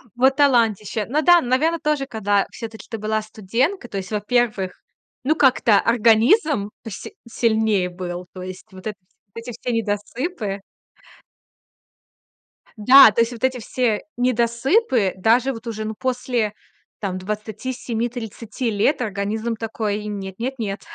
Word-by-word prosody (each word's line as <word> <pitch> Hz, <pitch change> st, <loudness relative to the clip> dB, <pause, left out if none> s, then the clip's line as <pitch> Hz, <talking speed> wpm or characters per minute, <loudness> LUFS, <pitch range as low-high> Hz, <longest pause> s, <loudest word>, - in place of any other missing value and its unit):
Вот 265 Hz, +2 st, +4 dB
талантище! 225 Hz, -7 st, +2 dB
Ну 290 Hz, +8 st, 0 dB
да, 350 Hz, +1 st, +6 dB
наверно, 300 Hz, +7 st, +1 dB
тоже, 300 Hz, -3 st, 0 dB
когда 205 Hz, -4 st, 0 dB
всё-таки 225 Hz, -1 st, -9 dB
ты 225 Hz, -, -4 dB
была 215 Hz, +1 st, -1 dB
студентка, 230 Hz, -, -2 dB
то 200 Hz, -, -6 dB
есть, 190 Hz, +1 st, -5 dB
во-первых, 215 Hz, -2 st, 0 dB, 0.5 s
ну, 300 Hz, +5 st, +2 dB
как-то 255 Hz, -7 st, +4 dB
организм 230 Hz, -, +3 dB
поси 225 Hz, -, -8 dB
сильнее 220 Hz, -5 st, +1 dB
был, 180 Hz, 0 st, -6 dB
то 185 Hz, -, -8 dB
есть 185 Hz, +2 st, -8 dB
вот 190 Hz, +2 st, -9 dB
этот 205 Hz, -3 st, -7 dB, 0.3 s
эти 230 Hz, +1 st, -7 dB
все 245 Hz, -, -4 dB
недосыпы 220 Hz, -, -2 dB, 2.2 s
Да, 255 Hz, +3 st, +9 dB
то 220 Hz, -, +2 dB
есть 230 Hz, +1 st, +1 dB
вот 235 Hz, -1 st, -10 dB
эти 260 Hz, -1 st, +1 dB
все 230 Hz, -2 st, 0 dB, 0.2 s
недосыпы, 245 Hz, -, +2 dB
даже 235 Hz, +7 st, +3 dB
вот 230 Hz, 0 st, -10 dB
уже, 220 Hz, -1 st, -4 dB
ну, 220 Hz, -, -3 dB
после 245 Hz, -3 st, -1 dB, 0.5 s
там 190 Hz, -3 st, -3 dB
27-30 225 Hz, +3 st, -4 dB
лет, 220 Hz, +7 st, +1 dB
организм 215 Hz, +1 st, -2 dB
такой 220 Hz, -2 st, -3 dB
им: 210 Hz, -1 st, -5 dB
"Нет, 190 Hz, -1 st, -7 dB
нет, 255 Hz, +4 st, -2 dB
нет, 200 Hz, -2 st, -3 dB
225 Hz, 140 wpm, -22 LUFS, 205-250 Hz, 2.2 s, Да